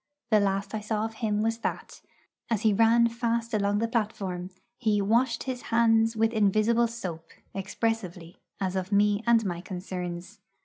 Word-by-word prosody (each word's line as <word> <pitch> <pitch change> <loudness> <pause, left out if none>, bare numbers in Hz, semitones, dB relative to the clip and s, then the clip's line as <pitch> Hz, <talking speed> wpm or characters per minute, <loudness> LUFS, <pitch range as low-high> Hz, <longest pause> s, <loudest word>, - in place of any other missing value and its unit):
The 215 - +6
last 195 0 -1
I 220 - -1
saw 215 0 -1
of 225 - -5
him 215 -2 -1
was 225 +1 0
that, - - -5 0.5
as 225 -4 0
he 220 -2 +3
ran 230 +2 +5
fast 235 0 -2
along 205 -1 +1
the 230 +2 0
platform, 200 -6 -2 0.3
he 215 -4 +2
'washed 230 +4 +1
his 255 -2 -4
hands 225 0 +3
with 225 +1 +1
invisible 215 +3 +3
soap,' 180 -9 -7 0.2
expressively, 195 -4 -3 0.2
as 190 -1 -2
of 190 +1 -3
me 205 0 +3
and 230 -2 +4
my 175 -2 -3
concerns. 180 -1 -6
215 Hz, 165 wpm, -27 LUFS, 195-230 Hz, 0.5 s, The